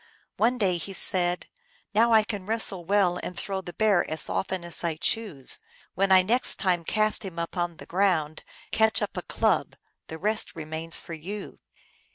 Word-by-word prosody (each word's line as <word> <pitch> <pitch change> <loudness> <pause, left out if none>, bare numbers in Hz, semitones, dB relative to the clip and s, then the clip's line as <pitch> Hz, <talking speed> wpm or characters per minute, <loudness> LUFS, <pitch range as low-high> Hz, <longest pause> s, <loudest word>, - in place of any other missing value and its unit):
One 245 +3 +2
day 190 -6 +1
he 195 +4 -6
said, 180 -1 +3 0.2
" 485 - -36
Now 230 +3 +4
I 220 -1 +6
can 205 -3 -5
wrestle 215 -5 -1
well 185 -2 +2
and 180 - -6
throw 195 +1 -3
the 175 - -8
Bear 210 0 +3
as 155 0 -1
often 190 -2 -2
as 170 - -1
I 165 -2 0
choose. 170 - 0 0.3
When 195 +1 +1
I 185 -1 +7
next 240 +7 +3
time 180 -3 0
cast 215 +5 +1
him 185 -4 -7
upon 170 0 -3
the - - -11
ground, 170 -5 0 0.3
catch 220 0 +3
up - - -4
a - - -3
club; - - 0 0.3
the 160 - -7
rest 215 +5 0
remains 160 +1 -2
for 170 - -9
you 190 +6 -7
185 Hz, 185 wpm, -26 LUFS, 170-210 Hz, 0.3 s, I